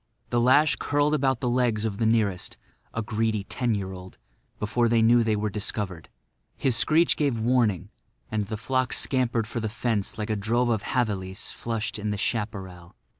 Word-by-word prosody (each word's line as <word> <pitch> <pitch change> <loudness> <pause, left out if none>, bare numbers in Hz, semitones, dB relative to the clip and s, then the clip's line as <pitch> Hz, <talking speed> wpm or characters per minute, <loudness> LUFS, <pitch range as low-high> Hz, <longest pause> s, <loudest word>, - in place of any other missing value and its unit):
The 120 -1 +2
lash 145 +5 +4
curled 145 +1 +1
about 135 -4 +1
the 125 - 0
legs 120 -3 +1
of 105 -1 -3
the 115 - +2
nearest—a 110 +1 -2
greedy 110 -1 -1
ten 120 +2 -1
year 95 -2 -4
old—before 105 +5 -4
they 115 -1 +3
knew 120 +1 +5
they 110 -1 +1
were 105 0 -1
discovered. 100 -4 -3 0.5
His 130 -3 +2
screech 160 +7 +3
gave 140 -6 0
warning; 110 -5 +1 0.4
and 105 -2 -1
the 110 0 -4
flock 130 +3 0
scampered 120 -4 +1
for 115 +1 -4
the 110 -1 -2
fence 115 -3 -2
like 110 0 -3
a - - +1
drove 115 +4 +1
of 110 -1 0
javelis 100 -7 -1
flushed 115 -1 -3
in 105 0 -2
the 105 - -1
chaparral. 100 -6 -4
110 Hz, 175 wpm, -26 LUFS, 105-120 Hz, 0.5 s, knew